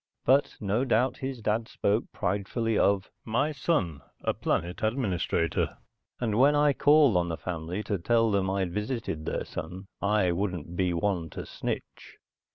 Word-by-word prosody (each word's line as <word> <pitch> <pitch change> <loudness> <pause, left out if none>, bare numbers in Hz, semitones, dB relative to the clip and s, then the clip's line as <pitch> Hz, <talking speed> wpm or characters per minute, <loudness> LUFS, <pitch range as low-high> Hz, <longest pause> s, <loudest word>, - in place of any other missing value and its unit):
But 135 +3 +3
no 105 +4 0
doubt 125 0 +2
his 130 -3 -5
dad 110 +2 0
spoke 105 0 0
pridefully 105 +4 -1
of 100 -1 +2
"My 120 +7 0
son, 125 - 0 0.2
a - - +1
planet 85 +2 -2
administrator," 100 -8 0 0.4
and 110 -2 0
when 145 +3 +6
I 145 -1 +4
called 145 -5 +5
on 85 -1 +1
the 80 - -3
family 90 +3 -4
to 100 -3 -2
tell 115 +4 +2
them 95 -2 +1
I'd 95 -3 -1
visited 105 -7 -3
their - - -2
son, 90 +5 -6 0.2
I 100 -3 +2
wouldn't 90 -2 -3
be 90 0 +1
one 85 -1 -1
to - - -7
snitch. - - -6
105 Hz, 160 wpm, -28 LUFS, 90-120 Hz, 0.4 s, when